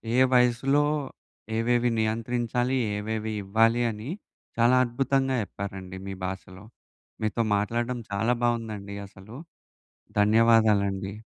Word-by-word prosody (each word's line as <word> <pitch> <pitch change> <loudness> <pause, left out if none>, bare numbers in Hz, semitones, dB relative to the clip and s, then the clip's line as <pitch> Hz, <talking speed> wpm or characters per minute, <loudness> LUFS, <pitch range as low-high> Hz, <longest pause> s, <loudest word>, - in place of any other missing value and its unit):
ఏ - - +3 0.2
వయసులో 125 +4 +3 0.7
ఏవేవి 120 +1 +2
నియంత్రించాలి, 120 +3 0 0.2
ఏవేవి 110 +1 -3
ఇవ్వాలి 115 +4 +3
అని 110 +6 -7 0.5
చాలా 120 +2 +5
అద్భుతంగా 135 +2 0
చెప్పారండి 95 -2 -7
మీ 95 - -4
భాషలో. 95 +1 -7 0.6
మీతో 110 +2 0
మాట్లాడటం 120 +4 -1
చాలా 110 +5 +1
బాగుందండి 110 -4 -2
అసలు. 100 +5 -14 0.9
ధన్యవాదాలండి. 105 -3 +3
115 Hz, 95 wpm, -26 LUFS, 100-120 Hz, 0.9 s, చాలా